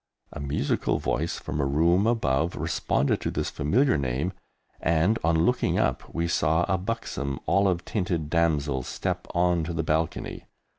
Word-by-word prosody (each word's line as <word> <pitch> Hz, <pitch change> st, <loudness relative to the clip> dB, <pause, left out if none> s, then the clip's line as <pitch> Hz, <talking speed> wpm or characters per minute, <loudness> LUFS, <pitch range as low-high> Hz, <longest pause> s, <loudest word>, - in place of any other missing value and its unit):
A -, -, -7 dB
musical 70 Hz, 0 st, 0 dB
voice 80 Hz, +6 st, -1 dB
from 75 Hz, -, -3 dB
a -, -, +1 dB
room 85 Hz, +8 st, +3 dB
above 85 Hz, -, +1 dB
responded 80 Hz, -3 st, 0 dB
to -, -, -1 dB
this -, -, -2 dB
familiar 120 Hz, -, +2 dB
name, 70 Hz, +7 st, -1 dB, 0.5 s
and, 85 Hz, +7 st, +2 dB
on 80 Hz, 0 st, +3 dB
looking 125 Hz, -, +1 dB
up, -, -, 0 dB
we 85 Hz, 0 st, -1 dB
saw 80 Hz, 0 st, +2 dB
a 95 Hz, -2 st, 0 dB
buxom, 90 Hz, -9 st, -3 dB
olive 95 Hz, -3 st, +2 dB
tinted 90 Hz, -7 st, -1 dB
damsel 75 Hz, -4 st, +1 dB
step -, -, -3 dB
on 90 Hz, -1 st, +2 dB
to 85 Hz, +2 st, -4 dB
the 80 Hz, 0 st, -1 dB
balcony. 80 Hz, +1 st, -2 dB
80 Hz, 155 wpm, -26 LUFS, 75-90 Hz, 0.5 s, room